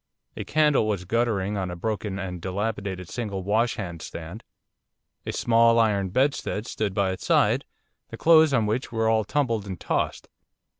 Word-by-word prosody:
A - - -4
candle 150 -7 +2
was 100 -4 -2
guttering 105 -2 0
on 95 -2 -2
a 90 - -5
broken 105 +1 -3
and 90 -3 -5
dilapidated 95 -1 -3
single 100 -5 -4
washhand 100 -5 -1
stand. 85 +7 -8 0.8
A - - -1
small 115 0 +3
iron 100 -4 +2
bedstead 130 -1 0
stood 105 -5 -3
by 100 -2 +1
its 95 - -6
side, - - +2 0.4
the - - -8
clothes 160 -2 +6
on 120 -5 +2
which 110 +5 -2
were 110 -1 0
all 110 -1 +3
tumbled 115 -4 -1
and 95 -4 -6
tossed. - - -2
105 Hz, 160 wpm, -25 LUFS, 95-115 Hz, 0.8 s, clothes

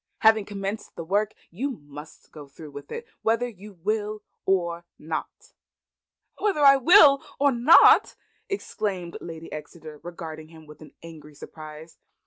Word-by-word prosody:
Having 220 -2 +5
commenced 200 +1 -6
the 165 - -6
work, 205 +5 -1 0.2
you 245 +12 -3
must 145 +2 -13
go 150 -2 -11
through 150 +2 -12
with 145 0 -11
it 465 - -6 0.2
whether 230 +2 +1
you 210 -2 -12
will 210 +3 -3 0.2
or 170 -3 0
not." 155 +1 -7 0.9
"Whether 400 -8 0
I 275 -1 +8
will 285 -1 +7 0.2
or 280 0 +4
not!" 245 +6 +6 0.3
exclaimed 200 - -4
Lady 165 -1 -9
Exeter, 155 0 -9
regarding 160 -3 -8
him 160 -1 -15
with 150 0 -15 0.2
angry 155 -3 -12
surprise. 155 +2 -11
175 Hz, 135 wpm, -25 LUFS, 155-220 Hz, 0.9 s, I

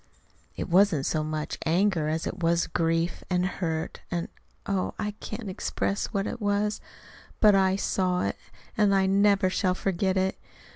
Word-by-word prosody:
"It - - -4
wasn't 175 -6 +4
so 155 -1 0
much 155 0 -4
anger 170 -1 +2
as 160 +1 -1
it 180 - -5
was 170 0 +2
grief 165 +1 0
and 180 -1 +1
hurt 165 -4 -3
and 170 -1 -2 0.4
oh, 195 -2 -1
I 210 -1 -2
can't 215 0 -6
express 195 +1 -2
what 200 -3 -2
it 240 - -5
was. 205 +1 0 0.6
But 210 -2 +6
I 190 -1 +3
saw 185 -2 0
it; - - -2 0.4
and 205 -2 +3
I 190 0 +3
never 200 0 +4
shall 185 -1 +1
forget 190 0 0
it. 190 0 0
190 Hz, 160 wpm, -27 LUFS, 170-200 Hz, 0.6 s, But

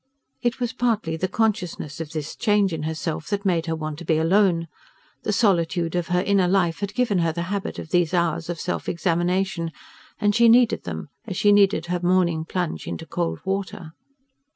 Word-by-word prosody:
It 240 +1 -1
was 245 0 -2
partly 225 -10 0
the 180 +3 -1
consciousness 185 -9 -1
of 160 - -5
this 155 -2 -5
change 205 -5 +2
in 160 - -3
herself 160 -1 -4
that 205 0 -2
made 170 -3 +1
her 165 - 0
want 155 -1 -5
to - - -7
be 160 -1 +1
alone. 170 0 +3 0.5
The - - -1
solitude 175 -5 +1
of 175 -1 -1
her 180 0 +1
inner 195 -3 +3
life 175 -3 +1
had 200 0 -4
given 225 -7 +2
her 165 -1 +2
the 170 +2 -3
habit 200 -1 -3
of 160 - -8
these 175 -3 +2
hours 170 -2 0
of 170 -2 -3
self 180 - -3
examination, 175 0 0 0.5
and 205 0 +2
she 235 +2 +5
needed 235 0 +4
them 80 - -5 0.2
as 190 -4 -4
she 205 - +4
needed 200 -4 +4
her 180 +1 -1
morning 175 -3 +2
plunge 175 0 -3
into 165 - -5
cold 170 +2 -3
water. 190 -4 -3
180 Hz, 195 wpm, -23 LUFS, 165-200 Hz, 0.5 s, she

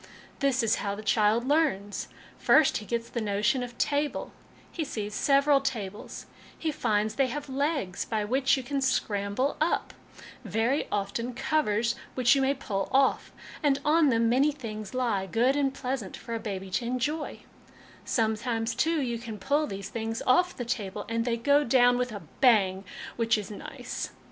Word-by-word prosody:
This 270 -3 +2
is 225 -1 +2
how 200 0 -2
the 215 - -8
child 220 +3 +2
learns. 270 -10 +1 0.3
First, 310 -3 +5
he 210 - -8
gets 235 -1 -2
the 235 - -4
notion 210 +4 +1
of 245 -1 -6
table; 290 0 -1 0.4
he 330 - -3
sees 210 -7 -4
several 280 +2 +4
tables; 215 -7 -5 0.3
he 320 - -1
finds 215 -5 0
they 270 +3 +2
have 290 +3 -5
legs, 275 - -1
by 215 -2 -2
which 265 +5 +2
you 265 - -4
can 275 +2 -2
scramble 220 0 0
up; 320 - 0 0.5
very 225 - 0
often 210 +5 -2
covers 235 -6 +1 0.2
which 250 -1 +5
you 275 - +2
may 270 +1 +2
pull 195 -7 -3
off; 270 0 +2 0.3
and 280 -2 +2
on 305 0 +4
them 230 -2 +3
many 265 +6 +3
things 215 -6 -7
lie, 225 -7 0
good 240 +7 +2
and 275 -2 0
pleasant 255 -7 -4
for 235 - -7
a 230 - -2
baby 195 -3 -5
to 235 - -1
enjoy; 255 +6 -2 0.6
sometimes, 225 0 0
too, 320 +5 +1
you 240 -3 -2
can 225 -2 -7
pull 285 +8 +1
these 195 0 -6
things 225 0 -3
off 355 +8 +3
the 245 - -4
table, 205 -4 -3
and 230 0 0
they 235 -1 0
go 285 +5 +3
down 245 -1 +4
with 250 0 -1
a 205 -2 -7 0.2
bang, 195 -7 +4 0.3
which 230 -1 +2
is 210 0 -6
nice. 205 - -6
240 Hz, 175 wpm, -28 LUFS, 215-275 Hz, 0.6 s, First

